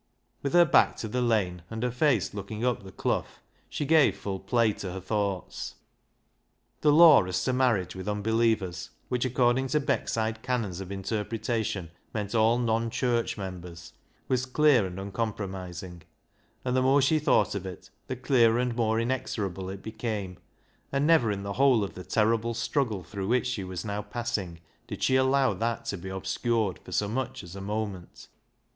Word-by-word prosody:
With 140 Hz, -, -2 dB
her 175 Hz, 0 st, +7 dB
back 155 Hz, -, +4 dB
to 110 Hz, -, -5 dB
the 125 Hz, +4 st, -1 dB
lane, 105 Hz, -7 st, +1 dB
and 110 Hz, +1 st, -4 dB
her 125 Hz, -, 0 dB
face 125 Hz, -, +1 dB
look 100 Hz, -1 st, -6 dB
ing 110 Hz, +2 st, -3 dB
up 125 Hz, -2 st, 0 dB
the 95 Hz, -1 st, -11 dB
Clough, -, -, -1 dB, 0.4 s
she 145 Hz, -, -3 dB
gave 140 Hz, -10 st, +4 dB
full 100 Hz, -1 st, -4 dB
play 110 Hz, +2 st, +2 dB
to 95 Hz, -3 st, -6 dB
her 95 Hz, -, -5 dB
thoughts. 100 Hz, -1 st, -3 dB, 1.0 s
The 150 Hz, -, +4 dB
law 155 Hz, -, +8 dB
as 90 Hz, -1 st, -1 dB
to 130 Hz, -, 0 dB
marriage 120 Hz, -9 st, +1 dB
with 95 Hz, +1 st, -7 dB
unbelievers, 105 Hz, -4 st, 0 dB, 0.2 s
which, 125 Hz, 0 st, 0 dB
according 125 Hz, +1 st, +2 dB
to 150 Hz, +4 st, +1 dB
Beckside 110 Hz, -5 st, -1 dB
canons 110 Hz, -8 st, -2 dB
of 95 Hz, 0 st, -7 dB
inter 100 Hz, +2 st, -2 dB
pretation, 110 Hz, -4 st, -2 dB, 0.3 s
meant 105 Hz, -1 st, -3 dB
all 115 Hz, +1 st, +4 dB
non 115 Hz, -1 st, 0 dB
church 120 Hz, -1 st, 0 dB
members, 90 Hz, -3 st, -8 dB, 0.3 s
was 130 Hz, 0 st, 0 dB
clear 130 Hz, -6 st, +4 dB
and 90 Hz, +1 st, -7 dB
uncompromising, 95 Hz, -3 st, -5 dB, 0.6 s
and 125 Hz, 0 st, 0 dB
the 130 Hz, -, +3 dB
more 135 Hz, +2 st, +4 dB
she 155 Hz, +3 st, +3 dB
thought 150 Hz, -, +2 dB
of 100 Hz, -2 st, -4 dB
it 90 Hz, -, -10 dB, 0.2 s
the 130 Hz, -, -3 dB
clearer 120 Hz, -3 st, +3 dB
and 125 Hz, -1 st, 0 dB
more 110 Hz, -1 st, +1 dB
inexorable 105 Hz, -6 st, -2 dB
it 95 Hz, 0 st, -7 dB
became, 110 Hz, -5 st, -4 dB, 0.5 s
and 140 Hz, +1 st, +1 dB
never 155 Hz, -9 st, +4 dB
in 100 Hz, -1 st, -3 dB
the 100 Hz, 0 st, -3 dB
whole 130 Hz, -3 st, +4 dB
of 100 Hz, -, -5 dB
the 90 Hz, -, -8 dB
terrible 115 Hz, +4 st, +1 dB
struggle 115 Hz, -8 st, -1 dB
through 95 Hz, +2 st, -5 dB
which 125 Hz, +3 st, +2 dB
she 120 Hz, -6 st, -2 dB
was 90 Hz, 0 st, -5 dB
now 105 Hz, 0 st, -2 dB
passing 105 Hz, -6 st, -4 dB, 0.3 s
did -, -, -6 dB
she 130 Hz, -, +3 dB
allow 130 Hz, 0 st, +3 dB
that 115 Hz, 0 st, -2 dB
to 110 Hz, -, -2 dB
be 95 Hz, +1 st, -7 dB
obscured 100 Hz, -, -1 dB
for -, -, -13 dB
so 105 Hz, -, +1 dB
much 130 Hz, +2 st, -3 dB
as 90 Hz, 0 st, -10 dB
a 100 Hz, -, -7 dB
moment. 100 Hz, -3 st, -5 dB
110 Hz, 180 wpm, -28 LUFS, 95-125 Hz, 1.0 s, law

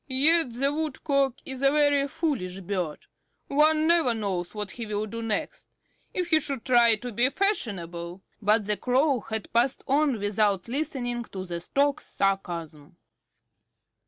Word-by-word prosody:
"Yet 280 Hz, 0 st, +4 dB
the 275 Hz, +4 st, +1 dB
Woodcock 275 Hz, -3 st, 0 dB
is 265 Hz, -1 st, -4 dB
a 275 Hz, -, +5 dB
very 290 Hz, -1 st, +3 dB
foolish 225 Hz, -, -3 dB
bird. 180 Hz, -4 st, -4 dB, 0.4 s
One 310 Hz, +2 st, +3 dB
never 330 Hz, -8 st, +3 dB
knows 190 Hz, -4 st, -3 dB
what 210 Hz, -2 st, -3 dB
he 230 Hz, +1 st, -7 dB
will 210 Hz, 0 st, -2 dB
do 230 Hz, +2 st, -6 dB
next. 225 Hz, -, -3 dB, 0.4 s
If 360 Hz, -1 st, -3 dB
he 315 Hz, -, +6 dB
should 275 Hz, -6 st, -4 dB
try 240 Hz, -3 st, +5 dB
to 245 Hz, +3 st, -7 dB
be 240 Hz, +4 st, +2 dB
fashionable" 185 Hz, -, -2 dB, 0.2 s
But 210 Hz, 0 st, +3 dB
the 210 Hz, 0 st, +1 dB
Crow 260 Hz, +1 st, +2 dB
had 220 Hz, -1 st, -4 dB
passed 240 Hz, +3 st, +1 dB
on 280 Hz, -2 st, +2 dB
without 205 Hz, -1 st, 0 dB
listening 245 Hz, -3 st, -2 dB
to 190 Hz, -3 st, -7 dB
the 170 Hz, -1 st, -5 dB
Stork's 280 Hz, +8 st, 0 dB
sarcasm. 170 Hz, -6 st, -3 dB
240 Hz, 150 wpm, -26 LUFS, 200-280 Hz, 0.4 s, he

